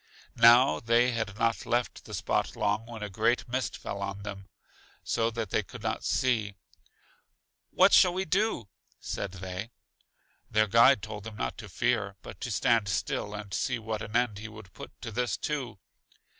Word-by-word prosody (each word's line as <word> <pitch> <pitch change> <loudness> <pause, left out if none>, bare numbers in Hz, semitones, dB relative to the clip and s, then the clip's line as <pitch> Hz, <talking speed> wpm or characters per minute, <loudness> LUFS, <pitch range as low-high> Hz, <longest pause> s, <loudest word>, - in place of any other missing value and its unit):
Now 120 +3 +7
they 120 +2 +3
had 110 -3 -3
not 115 0 +1
left 120 0 -1
the - - -6
spot - - -1
long 105 +2 0
when 115 -3 -7
a - - -2
great 115 +5 +1
mist 125 +1 -2
fell 100 - -6
on 100 0 -4
them, 100 -2 -7 0.6
so 115 0 +1
that 115 -4 -4
they - - +2
could - - -11
not - - -2
see. 110 -6 0 1.1
What - - +5
shall 180 - +7
we 185 +2 -2
do? 185 - 0 0.3
said 100 -2 -4
they. 95 +3 -6 0.8
Their 110 0 +3
guide 115 +3 +5
told 105 -2 -6
them 110 0 -8
not - - -3
to 105 - -9
fear, 110 -2 0
but - - -10
to - - -3
stand 115 -4 +2
still, 105 +4 -2
and 105 -2 -7
see 125 +4 0
what 110 -1 -4
an 110 0 -7
end 120 -4 +1
he 110 - -6
would 110 -3 -12
put - - -9
to 115 - -5
this 120 +3 -1
too. 140 -8 -3
110 Hz, 180 wpm, -29 LUFS, 105-120 Hz, 1.1 s, Now